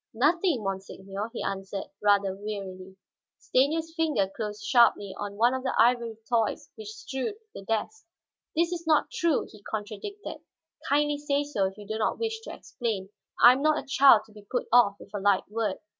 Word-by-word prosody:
"Nothing, 305 - +2
monseigneur," 195 +2 -5
he 240 - -5
answered, 195 0 -4
rather 200 -2 +3
wearily. 190 -2 -7 0.4
Stanief's 320 +5 +1
fingers 305 - 0
closed 210 -2 -5
sharply 220 -6 +4
on 205 -1 -5
one 235 +4 +3
of 260 - -2
the 260 0 -2
ivory 235 -1 +3
toys 230 -3 0
which 215 -1 -10
strewed 260 - -4 0.2
the - - -8
desk. 225 - -3 0.5
"That 320 - +3
is 340 -1 -5
not 310 -1 +3
true," 340 - +1
he 210 - -15
contradicted. 220 - -6 0.5
"Kindly 295 0 +2
say 290 0 0
so 240 -10 0
if 190 +1 -9
you 210 - -10
do 220 +2 -4
not 215 - 0
wish 445 -1 -3
to 450 - -8
explain; 210 -5 -4 0.3
I 240 - +11
am 265 - -3
not 310 0 +3
a - - -4
child 270 -5 +6
to 220 - -20
be 210 0 -13
put 245 +5 -3
off 235 -5 +6
with - - -15
a 205 - -2
light 195 -1 +2
word. 215 -3 -1
225 Hz, 185 wpm, -27 LUFS, 205-290 Hz, 0.5 s, I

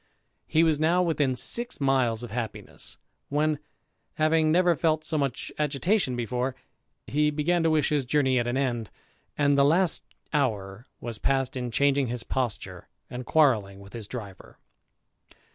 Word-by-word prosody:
He 160 - +3
was 160 -3 +2
now 170 +3 +3
within 150 -6 +1
six 240 - 0
miles 130 -5 +1
of 120 - -7
happiness; 115 -2 -6 0.3
when, 150 +1 +1 0.6
having 155 0 +3
never 175 0 +4
felt 155 0 +1
so 155 0 -1
much 140 -4 -2
agitation 150 - +1
before, 125 +2 -2 0.5
he 150 +1 +1
began 155 +4 +1
to 165 - +2
wish 155 -2 +2
his 150 -2 +1
journey 130 -1 +2
at 120 - -1
an 120 +2 -1
end, 120 -5 -1 0.5
and 145 -1 +3
the - - +6
last 170 +5 +3 0.3
hour 110 -6 -1
was 115 -3 -6
passed 135 -1 0
in 125 -1 -3
changing 140 +2 +2
his 120 0 -4
posture, 125 -5 -3 0.2
and 125 0 -6
quarrelling 110 -11 +2
with 100 0 -14
his 115 -3 -6
driver. 105 -5 -9
140 Hz, 155 wpm, -27 LUFS, 120-155 Hz, 0.6 s, the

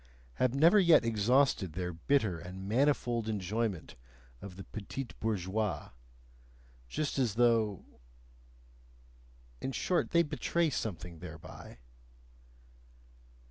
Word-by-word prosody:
have 130 0 +1
never 165 +9 +6
yet 170 -9 +6
exhausted 115 - +2
their 90 +1 -3
bitter 100 0 +1
and 90 +3 -8
manifold 120 -2 +1
enjoyment 105 -2 -2 0.5
of 95 -3 -9
the 95 - -8
betise 115 +6 -6
bourgeoise, 105 -1 -2 1.0
just 145 - -2
as 120 -6 +1
though... 115 -4 +2 1.8
in 135 - -2
short, 175 +6 0
they 170 0 +4
betray 160 +1 0
something 90 - -4
thereby. 80 -7 -10
110 Hz, 100 wpm, -32 LUFS, 95-135 Hz, 1.8 s, never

